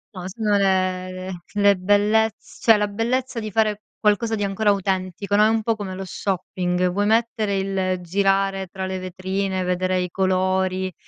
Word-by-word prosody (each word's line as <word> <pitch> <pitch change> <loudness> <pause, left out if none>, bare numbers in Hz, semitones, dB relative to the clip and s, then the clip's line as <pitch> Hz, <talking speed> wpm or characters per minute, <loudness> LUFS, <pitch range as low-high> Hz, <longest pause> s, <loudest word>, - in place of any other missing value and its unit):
No, 180 -1 -6
sono 210 +1 0
le 185 -1 0 0.2
le 205 -1 +4
bellezz 205 +3 +1
cioè 225 -2 +6
la 210 0 +1
bellezza 240 +4 -1
di 215 - -4
fare 215 0 +1 0.2
qualcosa 220 +1 +2
di 205 - -2
ancora 200 +2 +1
autentico, 195 0 -1
no, 210 - +5
è - - +6
un 225 0 +1
po' 225 +1 +1
come 200 -3 -6
lo 190 - -5
shopping, 180 -1 -1
vuoi 205 +3 0
mettere 220 -2 +1
il 190 -1 -1
girare 195 +1 +1
tra 190 +1 -5
le 190 0 -3
vetrine, 185 +1 -2
vedere 185 +1 0
i 180 - -3
colori, 185 0 0
195 Hz, 170 wpm, -22 LUFS, 185-210 Hz, 0.2 s, cioè